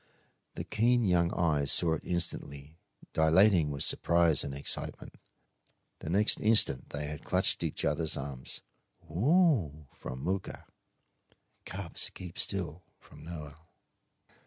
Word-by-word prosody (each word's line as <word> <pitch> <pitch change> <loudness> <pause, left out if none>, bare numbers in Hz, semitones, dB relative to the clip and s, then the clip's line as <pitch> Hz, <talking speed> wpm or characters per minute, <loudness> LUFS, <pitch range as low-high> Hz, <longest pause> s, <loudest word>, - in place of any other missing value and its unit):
The - - -4
keen 120 +2 +2
young 85 -2 +2
eyes 75 -5 +1
saw 85 -2 +2
it 80 - -3
instantly, 80 -3 -4 0.3
dilating 80 +1 +4
with 70 -1 -3
surprise 85 -2 +2
and 70 - -5
excitement. 70 +1 -3 0.9
The - - -7
next 100 +5 +3
instant 105 - +4
they 75 0 -4
had 75 0 -7
clutched - - +1
each - - -2
other's 80 -1 0
arms. 65 -2 -6 0.5
"Ooooo!" 105 - +2
from 65 +1 -8
Mooka. 95 +1 -3 1.0
"Cubs; 95 -3 -2
keep 90 -2 -8
still!" 90 -4 -2 0.2
from 75 - -16
Noel. 80 -1 -10
85 Hz, 120 wpm, -30 LUFS, 75-95 Hz, 1.0 s, dilating